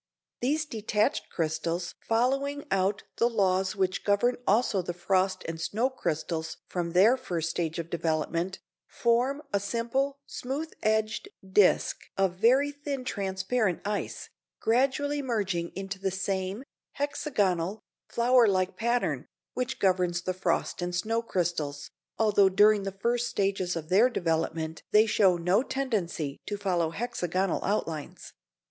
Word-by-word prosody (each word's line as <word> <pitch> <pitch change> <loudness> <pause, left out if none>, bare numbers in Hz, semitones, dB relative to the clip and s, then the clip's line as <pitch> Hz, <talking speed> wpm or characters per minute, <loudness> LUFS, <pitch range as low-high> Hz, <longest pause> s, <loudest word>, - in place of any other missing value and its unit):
These 300 +5 +1
detached 215 -5 0
crystals 165 +1 -2
following 275 +5 0
out 195 +1 +1
the 235 - +3
laws 190 -3 +1
which 190 -2 0
govern 210 +5 +2
also 210 -2 +3
the 175 0 -5
frost 185 +1 0
and 165 0 -5
snow 230 +9 0
crystals 160 -7 -3
from 170 -2 -3
their 205 +8 +6
first 175 -11 -3
stage 165 -1 -2
of 170 0 -5
development, 170 +3 -1 0.3
form 250 +5 +1
a 200 - +3
simple, 235 +7 -1
smooth 285 +6 -4
edged 215 - 0 0.2
disc 190 0 +4 0.2
of 195 -2 +2
very 260 +6 +4
thin 285 -2 -5
transparent 195 -1 -1
ice, 205 0 -3 0.3
gradually 275 +5 +1
merging 195 -9 -1
into 195 0 -5
the 195 0 0
same, 190 +3 -2 0.3
hexagonal, 210 - 0 0.3
flower 240 0 +4
like 185 -1 +1
pattern, 235 +4 0 0.3
which 255 +1 -2
governs 180 -2 +1
the 185 - -1
frost 185 0 -1
and 175 0 -2
snow 225 +6 0
crystals, 165 -9 -2 0.3
although 205 -3 +4
during 205 +2 +5
the 195 - -2
first 235 +5 0
stages 195 -4 0
of 160 -1 -5
their 210 +7 +5
development 160 -5 -1
they 215 +1 +6
show 195 -5 +4
no 180 +6 +2
tendency 200 - -2
to 205 - -2
follow 180 -5 0
hexagonal 185 -2 -1
outlines. 165 -7 -3
195 Hz, 135 wpm, -28 LUFS, 180-235 Hz, 0.3 s, their